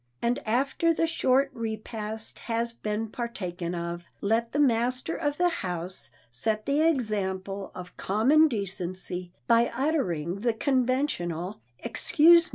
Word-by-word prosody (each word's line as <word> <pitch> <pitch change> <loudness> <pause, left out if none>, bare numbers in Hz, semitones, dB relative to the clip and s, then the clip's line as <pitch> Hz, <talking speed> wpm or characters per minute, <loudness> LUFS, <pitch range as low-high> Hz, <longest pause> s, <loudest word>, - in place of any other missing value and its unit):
And 235 +1 +1
after 275 +8 +2
the 330 - +2
short 275 -4 +2
repast 220 -1 -4
has 230 0 0
been 215 0 -3
partaken 180 -8 -4
of, 170 0 -4
let 225 +3 +1
the - - -2
master 255 +1 +2
of 290 -2 -1
the 355 0 +4
house 180 - -4 0.2
set 215 - -1
the 285 +2 +2
example 200 -9 0
of 180 -1 -9
common 265 +11 +4
decency 185 - -2
by 235 0 +4
uttering 200 - -1
the 230 +1 +1
conventional 240 - 0 0.2
"Excuse 330 +8 +5
me!" - - -14
225 Hz, 130 wpm, -27 LUFS, 190-270 Hz, 0.2 s, Excuse